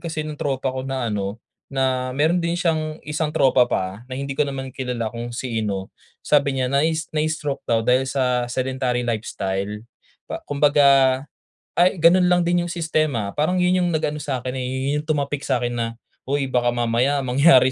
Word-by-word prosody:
kasi 160 -2 -3
ng 155 - -5
tropa 135 -1 -1
ko 130 - -2
na 135 -2 -3
ano, 100 +1 -3 0.3
na 130 -1 0
meron 160 +5 +2
din 170 0 -1
siyang 155 -3 0
isang 150 +1 -1
tropa 130 -4 +3
pa 95 +2 -2
na 130 - -5
hindi 140 +1 -3
ko 140 - +1
naman 135 -2 -4
kilala 125 -4 -3
kung 120 0 -5
sino. 110 -6 -3 0.3
Sabi 140 -2 +2
niya 130 - +1
nai 155 +4 +2 0.2
"Na 155 - +1
stroke" 150 -3 -3
daw 115 -1 +2
dahil 130 +2 +2
sa 125 -2 0
sedentary 130 -1 -1
lifestyle 105 -2 -3 0.4
pa - - -6
kumbaga, 140 -2 +4 0.6
ay 180 +2 +5
gano'n 180 +2 +5
lang 180 0 +3
din 175 0 +1
yung - - -5
sistema. 155 -11 0
Parang, 155 +5 0
yun 180 +1 +3
yung 175 -1 +1
nag-ano 150 -1 -1
sa'kin, 130 -4 -3
eh, 125 - -3 0.2
yun 150 - 0
yung 150 - -9
tumapik 145 -2 -1
sa'kin 120 -3 -1
na, 115 -1 -3 0.3
"Uy, 135 -1 -1
baka 120 -1 +2
mamaya 120 +4 +1
mangyari 130 0 +5
135 Hz, 180 wpm, -22 LUFS, 125-150 Hz, 0.6 s, ay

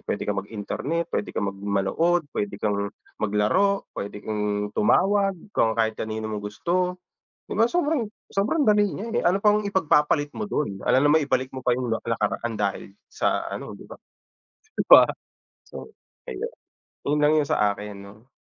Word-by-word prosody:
puwede - - -3
kang - - -1
mag-internet, 140 +10 -4
puwede - - -1
kang 100 - -1
mag 95 - -15
manood, 105 - +1
puwede 100 -1 -3
kang 100 -1 -1 0.3
maglaro, 110 - +2
puwede 100 +1 -6
kang 105 -1 -2
tumawag 195 - +3 0.2
kung 110 - +2
kahit 110 -1 +2
kanino 110 0 -3
mo 105 - -3
gusto. 180 - -1 0.5
'Di - - -4
ba 225 - +5
sobrang 300 -4 0 0.2
sobrang 210 +11 0
dali 210 -1 +4
niya 220 +4 -5
eh. 240 - +1
Ano 185 +3 +3
pang 210 0 +3
ipagpapalit 150 -6 +2
mo 215 - -2
dun, 105 - -3
alangan 130 +3 +3
naman 155 -1 +4
ibalik 130 -1 0
mo 130 -1 -7
pa 125 - +3
yung 125 0 -1
nak - - -2
nakaraan 115 0 -1
dahil 100 -1 -2 0.2
sa - - -1
ano, - - -6
'di - - -14
ba? - - -10 0.8
Di - - -1
ba? - - +10 0.7
So, 65 0 -10 0.4
ayun. 65 - -4 0.6
Yun 150 +1 +2
lang 150 +1 +5
yung 145 - 0
sa 105 -1 +2
akin, 105 0 -7
'no? 105 +4 -14
130 Hz, 175 wpm, -25 LUFS, -, 0.8 s, ba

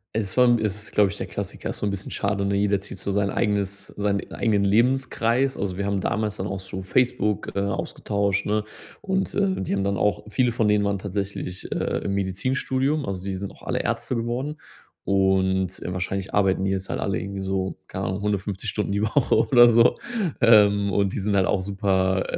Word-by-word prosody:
Es 100 -4 -2
vom 125 -1 +5
es 105 -3 -1
ist, 105 0 -8
glaube 100 -2 +4
ich, - - -7
der - - -4
Klassiker. - - -5
Ist - - -4
so - - -3
'n 100 - 0
bisschen 100 -1 -5
schade, 100 0 -1
ne, 100 0 0
jeder 100 -1 +1
zieht 95 - -8
so 100 - -3
sein 100 0 +1
eigenes 100 -1 -1
seinen 100 -1 -1
eigenen 105 -4 +1
Lebenskreis. 125 +3 +2
Also, 95 -2 -3
wir 100 - -2
haben 100 -1 0
damals 105 +1 -1
dann 95 - -3
auch 95 -1 -4
so 95 0 -7
Facebook, 105 0 0
äh, - - +1
ausgetauscht, 100 0 -1
ne. 105 +1 +1 0.4
Und, 190 -1 -1
äh, 195 -2 +1
die 95 - -3
haben 100 0 0
dann 100 0 0
auch 105 +1 +1
viele 125 +3 +1
von 115 -2 +1
denen 105 0 +3
waren 100 0 0
tatsächlich, 100 -1 -4
äh, - - -1
im 100 - -1
Medizinstudium. 130 +9 0
Also, 95 -2 -4
die 95 -1 -3
sind 100 +1 -5
auch - - -18
alle - - -1
Ärzte - - -2
geworden. 120 +6 -2 0.5
Und, 95 -1 +1
äh, 90 - -4
wahrscheinlich 95 +1 -3
arbeiten 95 -2 +2
die 95 - +1
jetzt 95 0 -3
halt - - -2
alle 100 -3 -1
irgendwie 100 +2 -5
so, 95 0 -2
keine - - -4
Ahnung, 95 +2 -2
150 100 -2 -2
Stunden 105 -2 -2
die 100 +1 0
Woche 115 +5 +2
oder 120 -3 +6
so. 115 +1 +4 0.4
Ähm, 100 -3 +5
und 100 -1 +1
die - - -2
sind 100 +1 0
halt 95 -1 +4
auch 95 - +1
super, 95 -1 +1
100 Hz, 210 wpm, -24 LUFS, 95-110 Hz, 0.5 s, oder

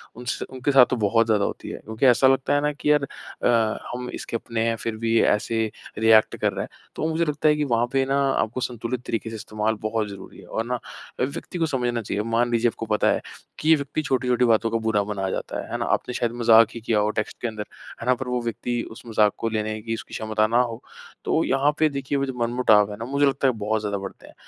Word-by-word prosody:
उनसे 120 0 -4
उनके 130 +2 -2
साथ 135 -2 +8
तो 130 - +1
बहुत 115 +1 +3
ज़्यादा 105 -3 +2
होती - - -5
है - - -5
क्योंकि 110 +5 -1
ऐसा 130 +1 +6
लगता 135 +1 +2
है 145 - +2
ना 150 0 +1
कि 150 +1 0
यार 150 -2 +3
अ, 115 -4 -1 0.2
हम 125 0 -5
इसके - - -6
अपने 115 0 -2
हैं 115 - +1
फ़िर 115 0 -4
भी 115 0 +2
ऐसे 110 +2 +1 0.4
रिएक्ट 110 0 +5
कर - - 0
रहा - - -3
हैं। - - -5 0.3
तो 155 - -1
मुझे 165 +1 +1
लगता 150 0 0
है 150 - +4
कि 150 - 0
वहाँ 120 -3 +1
पे 135 0 +2
ना 135 +1 +1
आपको 120 +4 -1
संतुलित 120 +1 -3
तरीके 115 0 -3
से 115 - -6
इस्तेमाल 110 0 -2
बहुत 110 0 -1
ज़रूरी 100 -1 -11
है - - -13
और 115 - -3
ना 125 0 -2 0.4
व्यक्ति 140 +6 -3
को 165 - +2
समझना 120 -5 -1
चाहिए। 105 0 -2
मान 120 +1 +1
लीजिए 120 0 +3
आपको 115 - -6
पता 105 -1 +2
है - - 0 0.4
कि 155 - 0
ये 160 - +8
व्यक्ति 145 +1 -3
छोटी-छोटी 125 -3 +1
बातों 115 0 +3
का 115 - +1
बुरा 105 -2 +2
मना 100 -2 -3
जाता - - -4
है। - - -12
है - - -1
ना? - - -2
आपने 125 - -7
शायद 120 -1 -1
मज़ाक 115 -1 +7
ही 115 - -4
किया 110 -2 +1
हो 105 +1 +2
टेक्स्ट 110 -1 -3
के 120 - -1
अंदर, 110 -2 -5 0.4
है - - -5
ना? 125 - +5
पर 125 +1 -6
वो 125 0 -1
व्यक्ति 120 +1 -2
उस 110 - -11
मज़ाक 105 -2 +3
को 115 - -1
लेने 110 0 -2
की 115 +1 -3
उसकी - - -7
क्षमता 110 0 0
ना 120 +3 +3
हो। 115 -1 -3 0.4
तो - - +2
यहाँ 135 +2 +2
पे 155 -1 +4
देखिए 140 0 -2
वो 140 - 0
जो 130 - -4
मनमुटाव 115 -4 +3
है 105 - -7
ना, 115 - -5
मुझे 140 +2 +2
लगता 135 0 +2
है 130 - +3
बहुत 110 0 -1
ज़्यादा 100 -1 -2
बढ़ते 95 -1 -9
हैं। - - -15
115 Hz, 255 wpm, -24 LUFS, 110-130 Hz, 0.4 s, साथ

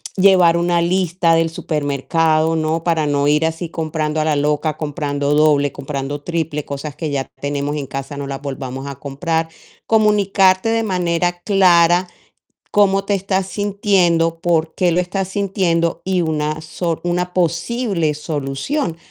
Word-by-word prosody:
llevar 185 -3 +5
una 175 0 +1
lista 175 -1 +1
del 165 0 +2
supermercado, 155 +1 0
¿no? 160 +1 -1
Para 165 -3 +1
no 145 0 +1
ir 150 +2 +3
así 165 +1 -4
comprando 155 -1 -2
a - - 0
la 155 -1 +1
loca, 150 +1 0
comprando 145 -2 -2
doble, 150 -2 +3
comprando 140 +1 -5
triple, 160 -2 -3
cosas 140 +1 -6
que 155 -1 -4
ya 135 -2 -2
tenemos 145 +1 -2
en 140 -3 -4
casa 135 +1 -6
no 140 0 -5
las 135 0 -5
volvamos 135 -1 -5
a 140 - -5
comprar. 160 +4 -2 0.4
Comunicarte 205 -2 +3
de 225 0 +1
manera 175 -3 -1
clara 180 -2 +4 0.7
cómo 195 -1 +3
te 205 - 0
estás 190 -1 -1
sintiendo, 190 -5 +1
por 165 -2 0
qué 180 -3 +2
lo 170 - +1
estás 190 +1 -3
sintiendo 185 -4 0
y 185 -1 +1
una 155 -1 -1
so 165 +1 -3
una 180 +1 -1
posible 175 0 0
solución. 150 - -3
165 Hz, 150 wpm, -19 LUFS, 150-180 Hz, 0.7 s, llevar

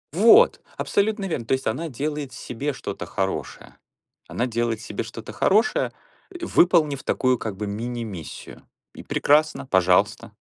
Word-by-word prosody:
Вот, 235 - +6 0.2
абсолютно 205 0 0
верно. 160 -11 -3
То 120 - 0
есть 130 - -1
она 160 +9 -2
делает 145 +1 -4
себе 135 +5 -4
что-то 130 - -6
хорошее. - - -4 0.5
Она 120 - -1
делает 115 -1 -1
себе 105 -2 -5
что-то 115 0 -9
хорошее, 230 - +2 0.4
и, 350 -2 -6
выполнив 155 - +3
такую 130 -1 +1
как 110 -4 -5
бы 105 +1 -4
мини-миссию. 110 -4 -6 0.3
И - - -10
прекрасно, 150 0 +2
пожалуйста. 90 -1 +2
130 Hz, 140 wpm, -24 LUFS, 115-170 Hz, 0.5 s, Вот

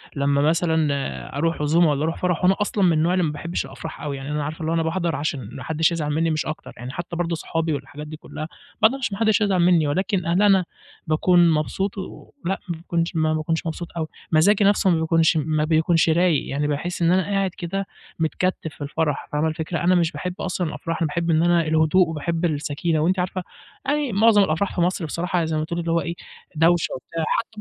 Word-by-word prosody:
لمّا 140 0 +2
مثلًا 155 -4 0
أروح 165 +1 0
عزومة 160 +2 +4
والّا 145 +1 0
اروح 165 +1 -1
فرح 180 -1 0
وأنا 190 +2 +5
أصلًا 205 -1 0
من 175 -3 +5
النوع 160 +3 +2
اللي 185 -1 +2
ما 150 - -1
باحبش 170 +4 -4
الأفراح 160 -3 -8
أوي، 140 -2 -4
يعني 135 +2 -6
أنا 150 -1 -1
عارفة 155 +3 -5
اللي 160 0 -1
هو - - +1
أنا 165 - +1
باحضر 165 -1 -1
عشان 140 -7 -3
ما 130 - -8
حدّش 160 +4 +1
يزعل 155 -3 -2
منّي 165 +2 +1
مش 155 - -1
أكتر، 155 - -6
يعني 125 +1 -7
حتّى 170 +3 -6
برضه 170 -1 -1
صحابي 165 0 -2
والحاجات 145 +2 -6
دي 155 0 -8
كلّها 155 0 -7 0.3
ما 220 - +8
اقدرش، 260 -2 -3
ما 195 - -4
حدّش 220 -1 +2
هيزعل 195 -3 +2
منّي 170 -3 +4
ولكن 185 +3 0
إن 170 +4 +2
أنا 195 -3 +4 0.4
باكون 175 +2 +4
مبسوط 190 +6 -1
و 190 - -8
لأ 195 +2 -1
ما 170 - -1
باكونش 170 0 -2
ما 155 -1 +2
باكونش 160 +1 -1
مبسوط 165 +1 -4
أوي، 160 -1 -2 0.2
مزاجي 195 +7 +4
نفْسه 200 -1 +4
ما 170 -3 +3
بيكونش 160 0 +3
ما 155 0 0
بيكونش 165 +1 +3
رايق، 170 -2 +2
يعني 145 +2 -1
باحس 165 +5 -3
إن 170 - +4
أنا 185 0 +3
قاعد 195 -1 0
كده 195 +3 -3 0.3
متكتف 160 0 -1
في - - -18
الفرح، 150 0 -2
فاهمة 150 +2 +1
الفكرة؟ 160 +1 -3
أنا 180 +1 +4
مش 170 -2 +2
باحب 180 -1 -4
أصلًا 180 -2 -2
الأفراح، 155 +2 -4
أنا 160 - +2
باحب 170 +2 -2
إن 160 0 +3
أنا 175 0 +4
الهدوء 160 +3 +3
وباحب 165 +2 -2
السكينة، 155 +1 -1
وأنتِ 180 +4 +1
عارفة 185 0 -2 0.4
يعني 290 -2 0
معظم 210 0 +5
الأفراح 175 +3 -1
في 175 - 0
مصر 175 -1 0
بصراحة 175 +4 -2
يعني 165 - 0
زي 155 -1 -1
ما 155 - -1
تقولي 170 +1 -3
اللي 170 0 -2
هو 170 - +2
إيه، 170 0 -4 0.4
دوشة 165 +2 +3
وبتاع 165 +5 -5 0.2
حتّى 220 -1 -8
165 Hz, 225 wpm, -23 LUFS, 155-180 Hz, 0.4 s, ما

